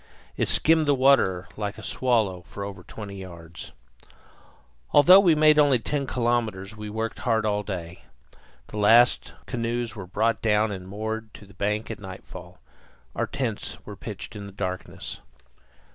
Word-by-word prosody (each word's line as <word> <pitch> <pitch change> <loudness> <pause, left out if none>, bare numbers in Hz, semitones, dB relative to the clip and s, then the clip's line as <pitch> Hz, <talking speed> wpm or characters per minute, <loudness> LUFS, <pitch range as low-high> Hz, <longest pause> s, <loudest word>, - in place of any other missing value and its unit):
It - - 0
skimmed 160 -1 +3
the 145 - +4
water 125 -9 +3
like 105 -1 -4
a - - -10
swallow 110 -8 0
for 100 +3 -8
over 100 -2 -7
twenty 100 +1 -9
yards. 85 -3 -10 1.2
Although 180 +7 +9
we 175 -5 +5
made 155 0 +5
only 145 -3 +5
ten 140 +3 -2
kilometres 115 -5 -1
we 105 -1 -7
worked 110 +2 -3
hard 115 -3 +1
all 105 -1 +1
day. 90 -4 -6 0.7
The 105 - -7
last 115 +4 +4
canoes 120 -1 -2
were 100 -4 -7
brought 110 +4 0
down 110 -1 +2
and 95 -2 -6
moored 110 +2 -4
to 105 - -12
the 100 - -17
bank 105 +4 -2
at 115 - -7
nightfall. 95 -2 -10 0.6
Our - - -1
tents - - -3
were - - -8
pitched - - -8
in 100 -1 -7
the - - -10
darkness. 95 -1 -5
110 Hz, 160 wpm, -25 LUFS, 100-120 Hz, 1.2 s, Although